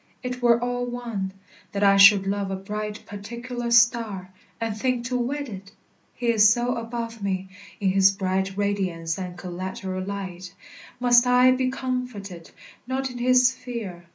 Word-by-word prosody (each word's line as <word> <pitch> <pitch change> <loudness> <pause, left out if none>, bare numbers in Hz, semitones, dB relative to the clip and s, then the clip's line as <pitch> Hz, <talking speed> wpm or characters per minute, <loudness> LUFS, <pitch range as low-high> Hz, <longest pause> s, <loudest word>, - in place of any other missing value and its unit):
It 250 0 -4
were 235 -1 +4
all 245 0 -2
one, 235 -6 -4 0.4
That 200 0 -1
I 200 0 +6
should 195 0 +8
love 200 0 -1
a 195 - -2
bright 210 +2 -5
particular 235 +4 -6
star, 230 -5 +2 0.3
And 225 -2 -2
think 245 +2 -1
to 250 +1 -2
wed 275 +4 -2
it, 195 -3 -9 0.4
he 240 -1 -2
is 215 -2 +6
so 240 +2 +1
above 230 -1 -5
me: 190 -1 -2 0.3
In 195 -2 +1
his 195 0 +5
bright 190 0 -2
radiance 190 -5 -1
and 180 -1 -6
collateral 185 +1 -5
light 185 -2 -6 0.4
Must 245 0 +5
I 250 +1 +6
be 255 0 +1
comforted, 250 -10 -5 0.4
not 265 0 -2
in 245 - -8
his 250 +1 +5
sphere. 225 -10 -7
215 Hz, 155 wpm, -24 LUFS, 195-245 Hz, 0.4 s, should